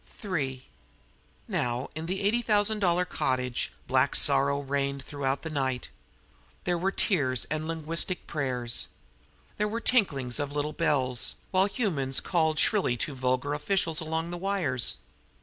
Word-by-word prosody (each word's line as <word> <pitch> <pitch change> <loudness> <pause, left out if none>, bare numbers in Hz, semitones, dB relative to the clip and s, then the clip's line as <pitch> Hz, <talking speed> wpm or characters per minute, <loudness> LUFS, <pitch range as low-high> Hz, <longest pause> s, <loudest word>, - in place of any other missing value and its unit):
III 135 -9 -2 0.8
Now, 120 +1 -1
in 160 +1 -5
the 190 +2 -2
eighty 215 +4 +2
thousand 215 -1 +2
dollar 180 -2 +2
cottage 125 -6 -1
black - - +2
sorrow 140 +1 +4
reigned 140 -1 -2
throughout 140 -1 -2
the 160 - -4
night. 130 -4 -1 0.7
There 175 - +1
were 190 +3 +1
tears 130 - +2
and 155 +1 -1
linguistic 165 +3 +1
prayers. 125 -5 -1 0.7
There 210 - +1
were 225 +2 -2
tinklings 145 - +1
of 145 -1 -3
little 150 +1 -1
bells, 130 -7 +2 0.2
while 190 +1 +4
humans 160 - -1
called 160 -3 +1
shrilly 180 - +2
to 145 - -3
vulgar 130 +2 0
officials 165 +1 +1
along 160 +1 -2
the 175 - -4
wires. 175 -12 +1
150 Hz, 140 wpm, -28 LUFS, 130-180 Hz, 0.8 s, sorrow